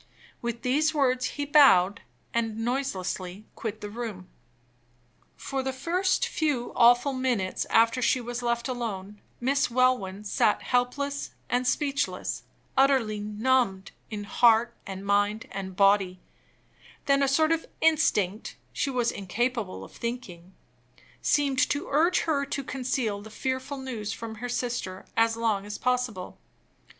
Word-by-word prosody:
With 235 -1 -4
these 305 +5 +2
words 255 -3 +2
he 290 - -1
bowed, 230 -9 +5 0.3
and 225 -2 -1
noiselessly 215 -6 -3
quitted 220 -1 -5
the 205 - -5
room. 215 -5 -6 1.1
For 270 -1 -3
the 265 0 -2
first 360 +8 0
few 290 -7 -1
awful 245 +4 +5
minutes 245 -8 -1
after 230 +2 +4
she 255 - +3
was 245 0 -5
left 235 0 -1
alone, 210 -5 -5 0.2
Miss 275 +3 +1
Welwyn 235 -6 +1
sat 210 0 +1
helpless 280 +3 -1 0.2
and 250 0 +1
speechless; 285 +1 -1 0.3
utterly 260 -6 +3
numbed 210 -1 0 0.2
in 210 -2 -5
heart, 230 +2 +4
and 195 0 -6
mind, 205 +2 +1
and 190 -1 -6
body 195 -2 +3 0.9
then 275 0 +3
a 275 - +3
sort 310 +4 +3
of 330 0 0
instinct 220 - +2 0.2
(she 280 - -1
was 245 -3 +1
incapable 210 +2 -2
of - - -12
thinking) 190 -7 -6 0.7
seemed 280 -3 +2
to 290 - -2
urge 330 +5 +3
her 295 -4 0
to 275 0 -3
conceal 250 -5 -2
the 220 - -11
fearful 260 +4 -3
news 235 -6 -4
from 230 -1 -6
her 245 - -3
sister 240 -7 -3
as 225 0 +3
long 220 -4 0
as 205 0 -6
possible. 250 -7 -2
240 Hz, 135 wpm, -27 LUFS, 205-265 Hz, 1.1 s, bowed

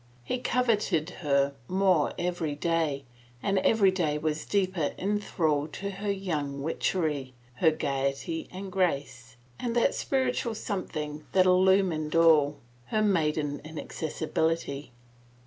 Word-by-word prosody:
He 255 - -2
coveted 210 -10 +1
her 140 -2 +2
more 185 -5 +2
every 175 -4 -2
day 155 -3 0 0.4
and 195 -1 +2
every 200 -1 +4
day 160 -6 0
was 150 0 -2
deeper 185 -6 0
in 205 +2 0
thrall 155 -7 0
to 200 0 -4
her 200 +1 -4
young 150 -8 -2
witchery, 150 -5 -1 0.2
her 160 - +5
gayety 140 +1 -2
and 190 +1 -7
grace, 140 -9 -1 0.2
and 240 -1 -2
that 240 - +3
spiritual 250 -3 0
something 155 -8 -4
that 185 -1 +5
illumined 185 -4 +3
all 155 -3 +5 0.2
— 120 0 -31
her 215 - +1
maiden 150 -7 +1
inaccessibility. 160 -2 -2
165 Hz, 125 wpm, -28 LUFS, 150-190 Hz, 0.4 s, her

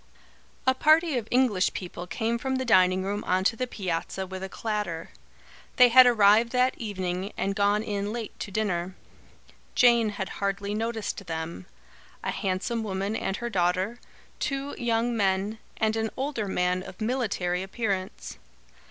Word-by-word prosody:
A 260 - +5
party 310 +3 +4
of 235 -3 -2
English 245 -7 +2
people 180 -1 -6
came 225 +7 -1
from 265 +1 -1
the 260 0 -1
dining 185 -4 +4
room 205 +2 -2
on 185 +1 +1
to 230 - +2
the 255 +2 -2
piazza 190 -2 -3
with 190 0 -7
a 190 - -5
clatter. 210 -8 -3 0.6
They 250 -1 +7
had 255 +1 +9
arrived 225 0 +5
that 255 +1 +3
evening 190 -3 -3
and 195 - 0
gone 205 +1 +2
in 205 -1 -2
late 230 -1 -5
to - - -5
dinner. 185 -3 -2 0.8
Jane 235 -3 +5
had 200 -2 -4
hardly 200 +1 -1
noticed 220 -3 -3
them, 160 - -5 0.6
a - - -1
handsome 195 +5 -2
woman 200 0 -2
and 195 -2 -2
her 240 - -4
daughter, 185 +4 0 0.4
two 275 0 -2
young 235 0 +1
men, 200 +1 0 0.2
and 220 0 +1
an 220 0 -1
older 265 -6 -2
man 180 -1 0
of 185 - -11
military 215 -7 -1
appearance. 195 -1 -3
205 Hz, 155 wpm, -27 LUFS, 190-235 Hz, 0.8 s, had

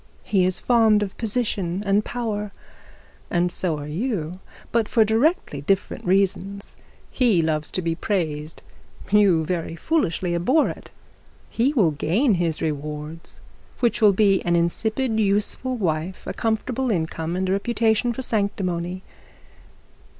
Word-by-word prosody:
He 190 -3 +2
is 185 0 0
fond 225 -4 +4
of 195 - -6
position 205 -5 0
and 200 +1 +2
power, 215 -4 -3 0.8
and 175 0 +1
so 175 -3 -1
are 145 - -6
you, 180 - -3 0.3
but 230 -2 +1
for 225 -2 +4
directly 225 - +1
different 195 +7 -1
reasons. 195 +1 0 0.4
He 225 -10 +3
loves 155 -1 -1
to 185 - -3
be 165 0 0
praised, 160 -4 -3 0.5
you 195 -6 +4
very 165 -1 -3
foolishly 180 - 0
abhor 255 - +2
it. - - -9 0.6
He 245 +5 +2
will 200 - +3
gain 200 - +1
his 165 -2 -1
rewards, 150 +1 -5 0.4
which 240 -1 +1
will 210 -2 +7
be 195 -1 +3
an 175 0 +1
insipid 220 +7 0
useful 210 +5 0
wife, 170 -2 -2
a - - -4
comfortable 240 +3 -1
income, 165 -3 -2
and 190 +1 -1
a - - 0
reputation 225 +3 +1
for 260 +3 -4
sanctimony. 185 -5 -2
195 Hz, 135 wpm, -23 LUFS, 170-220 Hz, 0.8 s, will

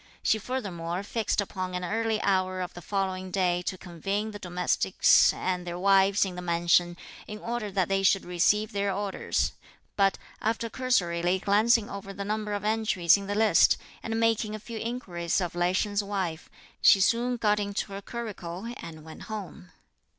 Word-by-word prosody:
She 220 - +2
furthermore 190 -8 -4
fixed 215 0 -1
upon 185 -2 -4
an 180 - -3
early 220 +3 0
hour 185 -1 +1
of 180 - -5
the 175 - -9
following 190 0 -2
day 180 -2 +1
to 185 +1 -4
convene 195 +5 -3
the 205 - -8
domestics 180 -1 +3
and 180 -1 -2
their 175 0 -4
wives 195 +1 +4
in 190 - -5
the 180 - -6
mansion, 175 0 +2 0.3
in 210 - -6
order 230 -1 -4
that 190 -3 0
they 195 0 +1
should 195 0 +3
receive 205 +5 +2
their 200 -1 0
orders; 200 0 -1 0.4
but, 195 -1 +3 0.2
after 225 +1 -1
cursorily 180 -9 +1
glancing 210 +3 +3
over 195 0 -7
the 200 0 -5
number 210 0 -2
of 205 -1 -3
entries 215 -6 +3
in 200 -1 -4
the 205 - -2
list, 220 +1 +5 0.2
and 225 0 -2
making 225 -2 +1
a - - -6
few 225 +1 -7
inquiries 190 -9 -2
of 175 -3 -2
Lai 175 +1 +1
Sheng's 205 +2 0
wife, 190 -5 -3 0.3
she 195 - +7
soon 240 +5 +2
got 210 -2 +2
into 200 0 -3
her 195 - -5
curricle, 215 -2 -6
and 160 -2 -9
went 160 - -11
home. 195 - -7
195 Hz, 175 wpm, -27 LUFS, 180-215 Hz, 0.4 s, she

